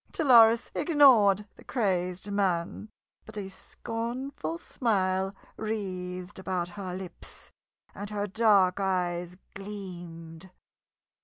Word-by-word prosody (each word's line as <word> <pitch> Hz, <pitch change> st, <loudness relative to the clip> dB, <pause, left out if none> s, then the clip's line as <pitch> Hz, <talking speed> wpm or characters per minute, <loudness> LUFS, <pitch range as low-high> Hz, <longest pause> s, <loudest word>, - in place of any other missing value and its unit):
Dolores 235 Hz, -6 st, +5 dB
ignored 250 Hz, -, +5 dB
the -, -, -15 dB
crazed 185 Hz, -4 st, -1 dB
man, 195 Hz, 0 st, -1 dB, 0.3 s
but 215 Hz, -1 st, -11 dB
a 195 Hz, -2 st, -5 dB
scornful 245 Hz, -, -5 dB
smile 195 Hz, -, 0 dB, 0.2 s
wreathed 185 Hz, -3 st, -4 dB
about 185 Hz, -2 st, -2 dB
her 185 Hz, 0 st, -6 dB
lips, 185 Hz, -1 st, -9 dB, 0.4 s
and 205 Hz, 0 st, -7 dB
her 205 Hz, -1 st, -2 dB
dark 205 Hz, -3 st, +3 dB
eyes 180 Hz, -2 st, -1 dB, 0.2 s
gleamed. 175 Hz, -4 st, -8 dB
195 Hz, 95 wpm, -28 LUFS, 180-220 Hz, 0.4 s, Dolores